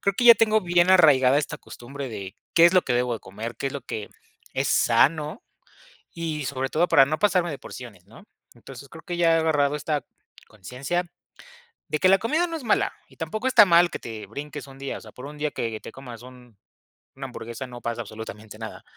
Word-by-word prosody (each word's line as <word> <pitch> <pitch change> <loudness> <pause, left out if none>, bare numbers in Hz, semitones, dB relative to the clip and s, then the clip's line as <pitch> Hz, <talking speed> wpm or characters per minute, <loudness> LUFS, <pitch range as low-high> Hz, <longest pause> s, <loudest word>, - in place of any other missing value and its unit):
creo 200 - +1
que 245 - 0
ya 235 - +11
tengo 220 0 +3
bien 175 -1 +3
arraigada 140 -7 +6
esta 145 - -3
costumbre 135 +3 -9
de 100 -4 -7 0.2
qué 170 - +7
es 175 - +2
lo 185 - +5
que 125 - -2
debo 125 0 +1
de 115 - -7
comer, 110 +5 -7
qué 135 - -2
es - - -9
lo 140 - -5
que 105 -2 -6 0.4
es - - -1
sano, 155 - +2 0.7
y 160 -4 -4
sobre 130 0 -2
todo 170 +5 +1
para 145 -5 +6
no 155 +3 -2
pasarme 180 -4 +2
de 140 - -7
porciones, 105 -8 -11
¿no? 115 - -16 0.3
Entonces, 135 +3 -12
creo 160 +2 -12
que 175 -1 -4
ya 165 -1 +4
he - - +3
agarrado 150 -3 +2
esta 150 0 -2 0.4
conciencia, 125 - -4 0.9
de 155 - -1
que 185 - +4
la 195 +1 +6
comida 310 +10 +1
no 330 -1 -5
es 295 - -8
mala 220 - +2 0.2
y - - -21
tampoco 215 +9 -4
está 255 -5 +7
mal 175 -2 +5
que - - -5
te 110 -3 -8
brinques 140 +8 -7
un 135 -1 -14
día, 140 0 -5
o - - -13
sea, - - -14
por 125 - -10
un 150 +1 -10
día 150 0 -1
que 115 -2 -4
te - - -10
comas 120 -4 -10
un 125 -3 -15 0.6
una 135 0 -6
hamburguesa, 120 0 -7
no 120 -1 -10
pasa 120 0 -3
absolutamente 110 -1 -9
nada. 110 0 -8
140 Hz, 220 wpm, -25 LUFS, 120-170 Hz, 0.9 s, ya